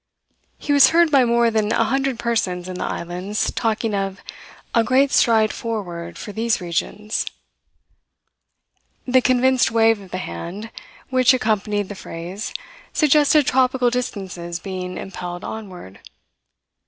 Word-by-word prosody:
He 290 - -1
was 280 -1 +8
heard 335 -1 +4
by 270 -4 +5
more 235 0 +3
than 215 -1 0
a - - +3
hundred 270 +1 0
persons 185 -7 -1
in 185 0 -6
the - - -2
islands 180 +5 -3
talking 225 -1 -1
of 195 -1 -2 0.5
a 230 - +4
"great 260 +4 +3
stride 220 -2 +3
forward 175 -7 -5
for 210 - -7
these 225 +2 0
regions." 200 +4 -2 1.8
The 255 0 +4
convinced 255 0 +3
wave 225 -1 +3
of 190 - -13
the 185 - -4
hand 185 - -6 0.4
which 255 0 +5
accompanied 210 -4 0
the 205 - -6
phrase 185 +2 -7 0.4
suggested 300 -1 +4
tropical 255 -1 +2
distances 190 -8 -4
being 185 -1 -6
impelled 175 -2 -6
onward. 185 - -8
220 Hz, 130 wpm, -21 LUFS, 185-250 Hz, 1.8 s, was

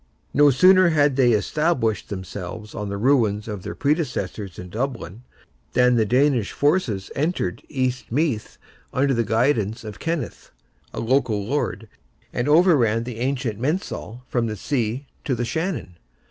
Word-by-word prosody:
No 145 0 +6
sooner 185 +6 +6
had 145 -4 +3
they 130 -3 +4
established 115 - 0
themselves 100 +2 -7
on 105 -2 -4
the 100 - -3
ruins 110 -3 +2
of 105 -3 -5
their - - -6
predecessors 140 - -2
in 90 - -8
Dublin, 115 -3 -4 0.5
than 125 0 +4
the 110 -2 +2
Danish 125 -2 +2
forces 145 - 0
entered 150 - -1
East 130 -4 -2
Meath, 135 -5 -1 0.3
under 135 +1 +2
the 115 -1 +1
guidance 110 0 +1
of 105 -3 -8
Kenneth, 165 -5 -4 0.4
a - - -6
local 115 -4 +1
lord, 125 -3 -2 0.5
and 120 +4 -1
overran 145 - +4
the 120 -2 -7
ancient 125 -4 -2
mensal, 130 - -3
from 120 -2 0
the 110 - -3
sea 125 +3 -2 0.2
to 130 - 0
the 120 +1 -2
Shannon. 160 - -3
125 Hz, 145 wpm, -23 LUFS, 105-145 Hz, 0.5 s, No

